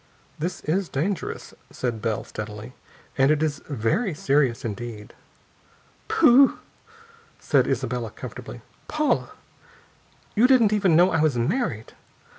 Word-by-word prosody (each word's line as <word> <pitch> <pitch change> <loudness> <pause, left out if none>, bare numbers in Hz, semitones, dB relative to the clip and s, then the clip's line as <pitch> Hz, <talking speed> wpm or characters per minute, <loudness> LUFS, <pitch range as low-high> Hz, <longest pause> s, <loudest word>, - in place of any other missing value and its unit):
"This 170 +4 -3
is 180 +4 -1
dangerous," 170 +7 -3 0.2
said 120 -4 -4
Bell, 110 -1 -1
steadily, 105 +3 -8 0.5
"and 135 +1 +5
it 155 0 +2
is 155 -2 -2
very 145 - 0
serious 135 -5 +1
indeed." 110 -1 -6 0.9
"Pooh!" 260 +3 +5 0.8
said 140 -4 +2
Isabella 125 -3 -2
comfortably. - - -9 0.3
"Paula, - - 0 1.1
you 230 +4 +5
didn't 240 -5 +4
even 195 -6 +3
know 180 +3 +5
I 160 - +1
was 155 -5 +2
married! 120 - -2
140 Hz, 115 wpm, -24 LUFS, 115-185 Hz, 1.1 s, and